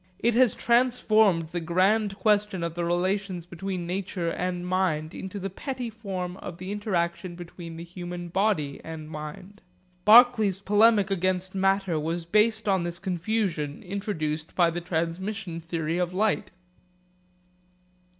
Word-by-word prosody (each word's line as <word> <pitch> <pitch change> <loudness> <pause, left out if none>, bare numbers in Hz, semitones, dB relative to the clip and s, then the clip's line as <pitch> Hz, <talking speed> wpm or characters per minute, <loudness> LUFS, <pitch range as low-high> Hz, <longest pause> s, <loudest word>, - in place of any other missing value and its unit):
It 235 +4 +2
has 245 0 +4
transformed 220 -8 +3
the 175 - -3
grand 195 +5 +2
question 205 -2 +1
of 170 -1 -2
the 175 0 -3
relations 180 +1 -1
between 180 +1 -5
nature 180 -1 -2
and 180 0 -3
mind 180 -4 0
into 190 +1 -6
the 195 0 -4
petty 250 +2 -5
form 190 -5 -5
of 175 - -8
the 185 +2 -6
interaction 180 -4 -2
between 170 -1 -9
the 165 - -6
human 175 0 -7
body 175 -7 0
and 160 -1 -7
mind. 155 +6 -8 0.4
Berkeley's 220 -3 +6
polemic 205 0 +4
against 185 0 0
matter 195 -3 +1
was 165 +2 -3
based 215 +4 +2
on 190 -3 +2
this 170 0 -4
confusion 180 -5 -2
introduced 160 -6 -3
by 170 -2 +4
the 175 +1 -4
transmission 170 +2 -3
theory 165 0 -2
of 180 0 -1
light. 210 0 +1
185 Hz, 140 wpm, -26 LUFS, 170-205 Hz, 0.4 s, Berkeley's